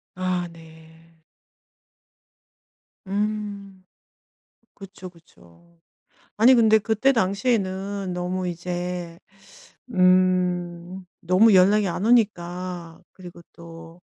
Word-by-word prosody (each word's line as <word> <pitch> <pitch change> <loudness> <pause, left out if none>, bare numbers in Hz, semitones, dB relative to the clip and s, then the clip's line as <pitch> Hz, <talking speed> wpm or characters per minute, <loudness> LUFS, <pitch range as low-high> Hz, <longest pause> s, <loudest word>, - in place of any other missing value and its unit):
아 180 -1 -2
네. 160 0 -18 1.9
음. 200 -1 -4 0.9
그쵸, 190 -2 -11
그쵸. 170 - -23 0.6
아니 235 +5 +6
근데 220 -2 +5
그때 220 +5 +1
당시에는 195 -3 -1
너무 180 +1 -3
이제 175 0 -5 0.8
음 180 -1 +1 0.2
너무 185 +5 +4
연락이 200 +3 +4
안 180 +3 -3
오니까 180 -6 -1
그리고 175 -2 -13
또 165 0 -13
185 Hz, 150 characters per minute, -23 LUFS, 175-200 Hz, 1.9 s, 아니